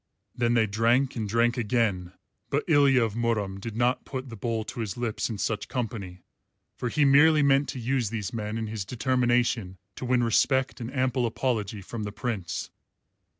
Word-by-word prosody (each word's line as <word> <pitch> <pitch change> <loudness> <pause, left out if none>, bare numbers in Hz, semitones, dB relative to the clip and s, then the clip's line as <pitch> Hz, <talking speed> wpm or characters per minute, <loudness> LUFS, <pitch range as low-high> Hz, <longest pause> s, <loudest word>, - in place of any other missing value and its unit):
Then 120 -1 +1
they 115 -2 +4
drank 115 +6 +2
and 110 -4 -3
drank 115 +3 +2
again; 105 -6 0 0.4
but - - 0
Ilya 140 -5 +5
of 110 -3 -1
Murom 110 -5 -1
did 110 +2 -6
not 120 +2 +1
put 130 -1 -6
the 115 - -7
bowl 115 +1 -2
to 115 - -8
his 105 -5 -3
lips 120 -2 -2
in 110 - -4
such 105 +1 -2
company, 100 -7 -5 0.5
for 125 - -3
he 150 +4 +2
merely 150 +2 +6
meant 140 0 +3
to 130 - -4
use 120 -2 0
these 105 -2 -4
men 110 -1 -3
in 115 - -2
his 110 -2 -4
determination 120 -3 0 0.2
to - - -5
win 125 -1 +2
respect 130 +3 +2
and 120 +2 -5
ample 130 -2 +1
apology 110 -4 -2
from 115 +3 -6
the 105 -1 -4
Prince. 105 -6 -4
115 Hz, 185 wpm, -27 LUFS, 110-125 Hz, 0.5 s, merely